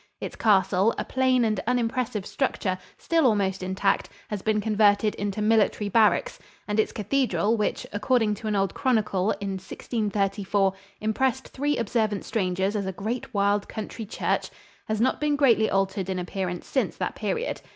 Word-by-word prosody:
Its - - -6
castle, 195 0 +3
a - - -2
plain 255 -2 +2
and 215 -3 0
unimpressive 235 -4 0
structure, 210 -8 -1 0.2
still 330 -5 +2
almost 195 -4 +1
intact, 190 +2 0 0.2
has 210 -2 -3
been 215 +1 +1
converted 210 -1 +3
into 205 +1 -3
military 210 -1 +2
barracks, 225 - +3 0.3
and 210 +1 0
its 215 - +2
cathedral, 230 -1 +1
which, 210 -2 -1
according 225 -1 +2
to 215 +1 -6
an 210 - 0
old 195 -1 +1
chronicle, 215 -7 +1
in 200 -1 -3
1634 200 -1 -1 0.3
"impressed 260 +4 0
three 290 +2 -1
observant 215 -2 0
strangers 190 -1 0
as 200 -2 -1
a - - -1
great 220 +8 -4
wild 205 -1 +1
country 220 0 -6
church," - - -1 0.4
has 215 -1 -1
not 255 +5 +1
been 300 -1 +2
greatly 240 -6 +4
altered 195 0 0
in 190 - -1
appearance 180 0 -3
since 265 - -1
that - - -2
period. - - -3
210 Hz, 160 wpm, -26 LUFS, 195-235 Hz, 0.4 s, greatly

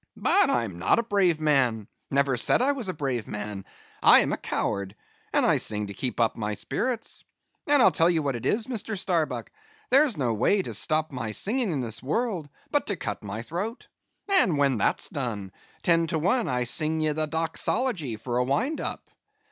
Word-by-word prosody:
"But - - +3
I 120 - +2
am 95 -6 -7
not 90 - +3
a 230 - +1
brave 195 -7 +2
man; 125 -9 +1 0.2
never 140 -1 +2
said 120 - +2
I 265 +3 +3
was 255 -8 -4
a - - -1
brave 130 -6 -3
man; 105 -2 -6 0.4
I - - +8
am - - 0
a - - -1
coward; 100 0 -3 0.4
and - - +3
I - - +4
sing 105 -1 0
to 100 - -7
keep 125 +4 -4
up 115 -2 +2
my 105 -1 -3
spirits. 230 - -3 0.4
And 290 -3 +6
I - - +7
tell 165 -1 +3
you 165 -3 +1
what 140 -3 -1
it 120 - -6
is, 220 +1 +1
Mr. 225 -4 -3
Starbuck, 175 -4 -1 0.4
there's 275 - +4
no 125 -5 0
way 190 - +2
to - - -6
stop 155 0 +1
my 125 -4 -4
singing 215 - 0
in 145 -5 -1
this 115 -2 -3
world 175 - -2 0.2
but 290 - +1
to 205 - 0
cut 105 - -5
my 105 +2 -6
throat. 200 - -5 0.4
And 365 - +3
when 135 -5 +2
that's - - +1
done, 110 -8 -4 0.3
ten 165 -1 +3
to 160 - -1
one 200 +10 +1
I 125 -1 0
sing 155 +6 0
ye 155 -1 +1
the 155 +1 -1
doxology 165 - -1
for 120 +3 -4
a - - +3
wind 145 - -1
up." - - -4
150 Hz, 205 wpm, -26 LUFS, -, 0.4 s, I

